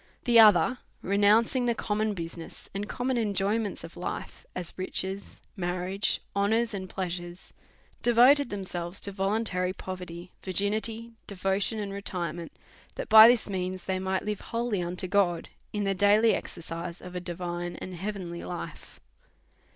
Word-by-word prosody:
The 235 -1 +6
other, 215 +3 +6 0.2
renouncing 215 +5 +3
the 235 - +2
common 215 0 -1
business 165 -1 -6
and 200 +2 -4
common 250 0 -1
enjoyments 205 0 -1
of 165 - -10
life, 180 - -6
as 180 -2 -3
riches, 190 +1 -4
marriage, 180 +1 -1
ho 200 0 +2
nours, 225 +1 +1
and 190 -2 -5
pleasures, 175 -1 -5 0.5
devoted 245 +3 +6
themselves 185 -2 -4
to 200 - 0
voluntary 195 -2 0
poverty, 180 -2 -7
virginity, 215 +4 -1 0.2
devotion, 195 +2 0
and 200 -2 -4
retirement, 175 -4 -4 0.4
that - - -5
by 220 0 +11
this 240 -1 +4
means 185 -2 -3
they 190 -1 -1
might 190 +1 -1
live 210 -1 -2
wholly 230 -4 -2
unto 175 +1 -3
God, 180 -3 +1 0.2
in 210 -1 -2
the 195 0 +1
daily 205 +3 +5
exercise 170 +1 -5
of 180 0 -9
a 180 - -3
divine 175 0 -4
and 185 - -7
heavenly 180 -2 -5
life. 175 - -7
195 Hz, 145 wpm, -28 LUFS, 180-215 Hz, 0.5 s, by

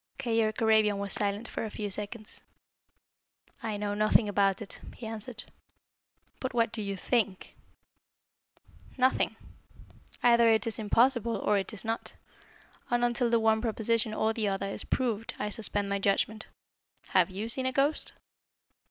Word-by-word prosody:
Keyork 225 -4 0
Arabian 215 -2 +4
was 200 -1 -2
silent 205 +2 0
for - - -4
a 220 - -3
few 205 -1 -4
seconds. 210 +2 -4 1.2
"I 220 -3 -3
know 205 0 -2
nothing 215 +1 +3
about 200 -1 +2
it," 215 - -8 0.2
he 240 - -9
answered. 220 +1 -5 1.0
"But 260 -1 -4
what 230 -1 +2
do 225 - -4
you 200 -1 -3
think?" 210 -2 -1 1.4
"Nothing. 255 0 +2 0.9
Either 235 -1 +6
it 220 -1 +3
is 225 -1 -2
possible, 235 -2 +3
or 205 -1 +2
it 195 - -4
is 215 0 -6
not, 225 +1 -3 0.7
and 240 0 +2
until 240 0 +1
the 230 0 +3
one 220 0 +3
proposition 225 -1 +1
or 220 +1 +1
the 220 -2 0
other 195 0 -1
is 195 - -3
proved 230 -4 -1
I 210 0 -3
suspend 205 -2 -2
my 200 0 -1
judgment. 210 +2 0 0.6
Have - - +4
you 200 +4 -4
seen 260 +3 +1
a - - +1
ghost?" 280 +3 +2
220 Hz, 150 wpm, -29 LUFS, 205-235 Hz, 1.4 s, Either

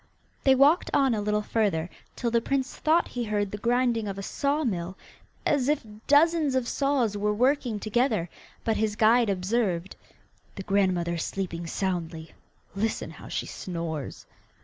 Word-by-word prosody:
They 265 -1 +5
walked 285 +6 +4
on 270 -3 +3
a 215 - -1
little 210 0 0
further, 200 -8 0 0.3
till 235 -2 -2
the 235 0 +3
prince 270 +2 -1
thought 325 +2 +2
he 245 - -3
heard 205 -2 -1
the 210 - -5
grinding 240 -1 +1
of 195 -1 -4
a 195 - -5
saw 285 +8 -1
mill, 185 - -3 0.5
as 285 -2 +2
if 300 -5 0 0.2
dozens 300 -1 +4
of 255 -2 0
saws 275 -7 +1
were 210 +1 0
working 250 -2 +1
together, 215 -4 +1 0.4
but 225 -1 0
his 215 -1 0
guide 225 +1 +4
observed, 190 -2 -1 0.6
'The 195 - -6
grandmother 185 -4 +1
is 165 - -2
sleeping 170 -3 -4
soundly; 165 -3 -3 0.4
listen 215 +3 -2
how - - -12
she - - -3
snores. 165 -5 -5
215 Hz, 160 wpm, -27 LUFS, 190-255 Hz, 0.6 s, They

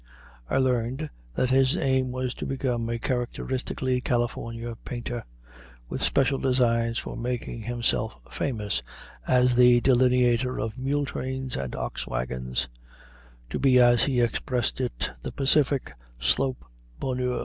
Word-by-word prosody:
I - - +1
learned 130 +3 0 0.2
that 130 - +1
his 135 +4 +4
aim 130 -3 +1
was 130 0 -2
to - - -5
become 125 -4 -1
a 115 - -1
characteristically 125 +1 -2
California 120 -1 -2
painter, 120 -1 -4 0.7
with - - -4
special 135 0 +2
designs 115 -3 +2
for - - -4
making 120 -1 -3
himself 115 -1 0 0.2
famous 105 - -1 0.5
as 125 0 +4
the 125 0 +7
delineator 125 0 +3
of 110 +1 -3
mule 140 +2 0
trains 130 -1 -4
and 65 -2 -4
ox - - -4
wagons; 65 +1 -2 0.8
to - - -2
be, 130 -2 +5
as 120 -1 +6
he 130 -3 +2
expressed 125 +1 0
it, 125 - -2
"the - - -5
Pacific 140 0 +2 0.3
Slope 130 - +1 0.3
Bonheur." 125 -1 -1
125 Hz, 130 wpm, -26 LUFS, 115-130 Hz, 0.8 s, the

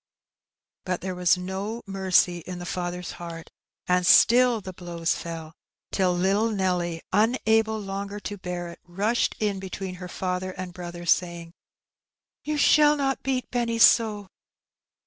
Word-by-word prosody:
But 185 -1 -3
there 185 0 -3
was 180 0 +3
no 195 +5 -5
mercy 190 -3 +2
in 180 +2 -7
the 175 - -7
father's 180 -1 -4
heart, 170 -1 -9 0.3
and 180 0 +2
still 240 +5 +6
the 190 -2 -8
blows 170 -2 -2
fell, 165 -1 -7 0.4
till 185 -2 +2
little 195 +5 +1
Nelly, 180 -5 -1
unable 220 0 +2
longer 200 0 -5
to 205 -1 -6
bear 180 -1 -5
it, 170 - -11
rushed 205 +7 0
in 205 -3 -1
between 190 -1 -6
her 180 - -5
father 185 +1 -3
and 185 -1 -7
brother, 175 -1 -8
saying, 170 -1 0 0.9
^^You 305 0 0
shall 300 0 +5
not 270 -1 -1
beat 260 -1 -2
Benny 235 -2 0
so." 220 -3 +5
185 Hz, 145 wpm, -25 LUFS, 175-215 Hz, 0.9 s, still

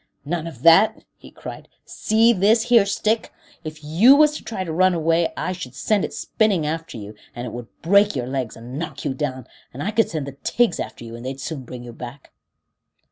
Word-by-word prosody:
"None 165 +2 -3
of 135 -6 -10
that," 200 +7 +5
he - - -15
cried. - - -10 0.2
"See 225 +2 +3
this 215 +3 +3
here 230 -5 +6
stick? 215 +2 0 0.3
If 155 -1 -8
you 185 - +6
was 300 0 +5
to - - -7
try 205 -5 -4
to 165 -3 -5
run 185 +2 +3
away 165 +1 +1
I - - -2
should 135 -9 -7
send 210 -3 +1
it - - -3
spinning 200 -8 0
after 160 -3 -4
you, 105 -1 -8 0.2
and 120 - -5
it 115 - -7
would 120 -1 -7 0.2
break 200 +3 +4
your 125 -3 -2
legs 130 -3 -4
and 125 +5 -7
knock 155 -4 -6
you 140 - 0
down, 130 -3 -4 0.3
and 135 +4 -6
I 210 - -1
could 225 +1 +2
send 155 -4 -3
the 140 -1 -9
tigs 235 -7 +1
after - - -6
you, 115 0 -8
and 120 - -9
they'd 130 +1 -5
soon 140 -3 -5
bring 125 0 -9
you 120 -1 -9
back." 125 +3 -10
160 Hz, 220 wpm, -22 LUFS, 130-200 Hz, 0.3 s, here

